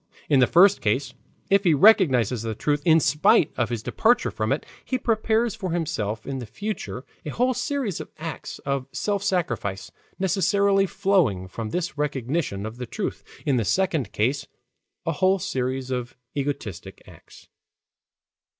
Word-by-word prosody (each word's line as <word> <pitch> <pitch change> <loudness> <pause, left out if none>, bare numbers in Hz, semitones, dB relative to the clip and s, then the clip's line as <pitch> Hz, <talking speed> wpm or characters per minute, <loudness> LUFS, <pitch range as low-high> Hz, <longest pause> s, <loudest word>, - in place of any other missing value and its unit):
In 140 -3 +5
the 125 - +5
first 185 +4 +5
case, 125 +5 0 0.4
if 200 0 +5
he 170 -5 +4
recognizes 135 - +5
the 110 -1 -3
truth 145 +5 0
in 160 -1 +6
spite 150 0 +3
of 120 -2 0
his 115 -2 -3
departure 235 +2 +2
from - - -2
it, - - -1 0.2
he 255 - -1
prepares 225 -1 +1
for 185 - -5
himself 115 -11 -2
in 135 -1 -4
the 120 - -7
future 200 - -5 0.2
a - - -5
whole 250 - +1
series 255 - -2
of - - -9
acts 160 0 -6
of 140 -2 -1
self 205 -2 -1
sacrifice 120 - -2 0.3
necessarily 195 +1 +2
flowing 160 - +1
from 110 +4 -5
this 175 +2 -3
recognition 135 -6 -2
of 110 +2 -7
the 125 -1 -6
truth; - - -4 0.2
in 135 -3 +2
the 115 - +1
second 160 - 0
case, 125 +7 0 0.6
a 165 - +1
whole 185 +5 +2
series 130 -5 -3
of 125 0 -4 0.2
egoistic 105 - -5
acts. - - -16
145 Hz, 160 wpm, -24 LUFS, 120-190 Hz, 0.6 s, in